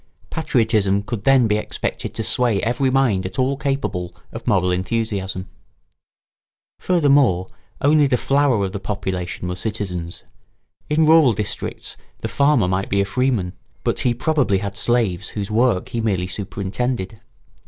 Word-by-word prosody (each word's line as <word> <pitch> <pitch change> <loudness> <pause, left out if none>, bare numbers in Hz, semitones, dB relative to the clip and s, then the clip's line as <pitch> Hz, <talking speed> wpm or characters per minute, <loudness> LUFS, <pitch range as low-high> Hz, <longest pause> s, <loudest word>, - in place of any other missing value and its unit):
Patriotism 110 -9 +1
could 105 -1 -5
then 135 -3 +5
be 105 -1 +2
expected - - -4
to - - -2
sway 120 -5 +1
every 125 +4 +1
mind 130 -8 +2
at 95 - -6
all 130 +1 +1
capable 135 -11 -2 0.2
of - - -9
moral 90 -1 +3
enthusiasm. 95 -1 -2 1.3
Furthermore, 140 - +3 0.4
only 145 0 +4
the 130 -2 +2
flower 135 -6 +2
of 95 - -4
the 100 - -4
population 95 -3 -4
were 90 - -3
citizens. 90 -4 -4 0.7
In 155 +1 +3
rural 155 -6 +6
districts 105 -1 -4 0.2
the - - -2
farmer 140 -8 +3
might 95 +1 -1
be 100 - +1
a 100 - +2
freeman; 105 -4 0 0.3
but - - 0
he 120 -1 +1
probably 135 -6 +1
had 100 +1 -4
slaves 105 -6 +1
whose 100 -1 -4
work 115 -3 +2
he 115 - -2
merely 95 -5 0
superintended. 105 +3 -3
110 Hz, 145 wpm, -21 LUFS, 95-130 Hz, 1.3 s, rural